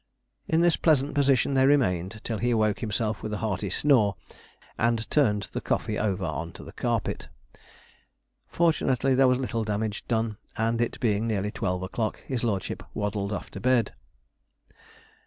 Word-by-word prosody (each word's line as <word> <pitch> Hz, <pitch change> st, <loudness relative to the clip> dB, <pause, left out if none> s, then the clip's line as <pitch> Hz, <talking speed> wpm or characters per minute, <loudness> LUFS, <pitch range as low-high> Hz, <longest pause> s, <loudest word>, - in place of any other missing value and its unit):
In 160 Hz, +1 st, +2 dB
this 175 Hz, -1 st, +4 dB
pleasant 145 Hz, -3 st, +2 dB
position 140 Hz, -2 st, +3 dB
they 135 Hz, 0 st, +4 dB
remained 110 Hz, -7 st, +1 dB
till 115 Hz, -3 st, -3 dB
he 120 Hz, -, +1 dB
awoke 110 Hz, -3 st, +2 dB
himself 110 Hz, -1 st, -2 dB
with 110 Hz, -, -4 dB
a -, -, -1 dB
hearty 105 Hz, -2 st, -2 dB
snore, 110 Hz, -3 st, +3 dB, 0.6 s
and 115 Hz, -1 st, 0 dB
turned 105 Hz, -9 st, +3 dB
the -, -, -2 dB
coffee 105 Hz, -, -1 dB
over 95 Hz, -3 st, -1 dB
on 80 Hz, 0 st, -4 dB
to -, -, -10 dB
the -, -, -10 dB
carpet. -, -, -2 dB, 1.2 s
Fortunately 135 Hz, -6 st, +2 dB
there 130 Hz, 0 st, +5 dB
was 125 Hz, 0 st, +3 dB
little 120 Hz, -3 st, -2 dB
damage 105 Hz, 0 st, -2 dB
done, 110 Hz, -2 st, 0 dB, 0.2 s
and, 115 Hz, +1 st, +1 dB
it 120 Hz, -, -1 dB
being 110 Hz, -1 st, +1 dB
nearly 105 Hz, -2 st, -1 dB
twelve 90 Hz, -3 st, -2 dB
o'clock, 110 Hz, +4 st, -2 dB
his 125 Hz, -3 st, -3 dB
lordship 100 Hz, -5 st, -2 dB
waddled 100 Hz, 0 st, -2 dB
off 100 Hz, -, -5 dB
to -, -, -7 dB
bed. 125 Hz, +1 st, +2 dB
110 Hz, 160 wpm, -27 LUFS, 105-130 Hz, 1.2 s, there